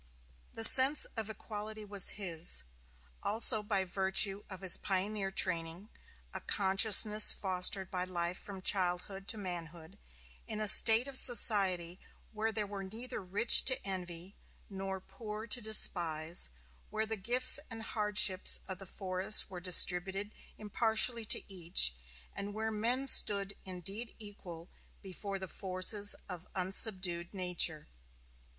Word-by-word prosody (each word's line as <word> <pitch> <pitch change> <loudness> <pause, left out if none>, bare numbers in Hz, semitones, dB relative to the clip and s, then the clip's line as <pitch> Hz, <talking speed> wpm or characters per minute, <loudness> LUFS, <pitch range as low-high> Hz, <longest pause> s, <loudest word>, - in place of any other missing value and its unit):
The 225 - -7
sense 265 +5 +6
of 225 -2 -8
equality 215 0 -11
was 200 -2 +2
his, 175 -4 -3 0.6
also 220 +1 +3
by 205 -2 -4
virtue 195 +2 0
of 190 -1 -12
his 185 -2 +5
pioneer 195 +1 -5
training 175 +1 -3 0.4
a - - -9
consciousness 210 +2 +5
fostered 190 0 -5
by 180 -1 -5
life 175 0 -7
from 195 -2 -13
childhood 190 +1 -2
to 220 - -2
manhood 175 -1 -11 0.5
in 215 -1 -7
a 215 - -3
state 225 +4 +6
of 270 -1 +1
society 190 -7 0 0.3
where 220 +1 -6
there 215 -1 -5
were 200 -1 -10
neither 220 +5 -10
rich 200 +5 +4
to 260 - +3
envy 180 -1 -9 0.4
nor 190 0 -8
poor 215 +2 -12
to 240 +2 -4
despise, 170 - +4 0.4
where 215 +1 -6
the 220 0 -6
gifts 245 +7 +2
and 225 -2 -11
hardships 210 -4 0
of 190 -2 -10
the 195 - -12
forest 190 +2 +1
were 180 - -10
distributed 185 +3 +5 0.2
impartially 220 +2 -3
to - - -1
each, 170 - 0 0.4
and 205 +1 -9
where 220 +1 -6
men 235 +5 -4
stood 200 -6 -1
indeed 195 +5 -7
equal 185 -6 -12 0.4
before 195 +1 -9
the 190 0 -10
forces 195 +3 -1
of 180 -2 -12
unsubdued 185 -2 -4
nature. 175 -4 -1
195 Hz, 130 wpm, -29 LUFS, 185-215 Hz, 0.6 s, sense